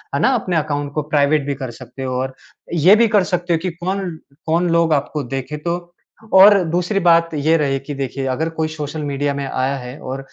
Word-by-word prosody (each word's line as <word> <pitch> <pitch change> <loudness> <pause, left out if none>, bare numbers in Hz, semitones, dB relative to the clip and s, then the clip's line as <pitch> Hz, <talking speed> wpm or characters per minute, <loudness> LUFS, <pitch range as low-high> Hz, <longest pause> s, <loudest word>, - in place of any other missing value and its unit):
है - - +1
ना, - - +4
अपने 185 -6 -1
अकाउंट 145 -2 -2
को 155 - 0
प्राइवेट 145 -1 +2
भी 140 - -1
कर 130 - -4
सकते 135 +3 -10
हो 130 -1 -3
और 130 0 -4 0.4
ये 175 +5 +6
भी 230 +1 +4
कर 205 -3 +3
सकते 175 -1 -1
हो, 165 - +1
कि 185 +3 -2
कौन-कौन 170 -2 -3
लोग 165 -1 +3
आपको 145 +1 -1
देखें 135 +3 -5
तो 170 +3 -1 0.6
और 195 0 +8
दूसरी 180 +4 0
बात 170 -2 +4
ये 155 +2 +2
रही 135 -3 0
कि 145 - -7
देखिए, 135 0 -4
अगर 155 +6 -1
कोई 160 -1 -2
सोशल 155 0 -5
मीडिया 145 0 -1
में 140 0 -4
आया 130 +1 -1
है 125 +2 -8
और 130 +1 -5
155 Hz, 215 wpm, -19 LUFS, 140-175 Hz, 0.6 s, और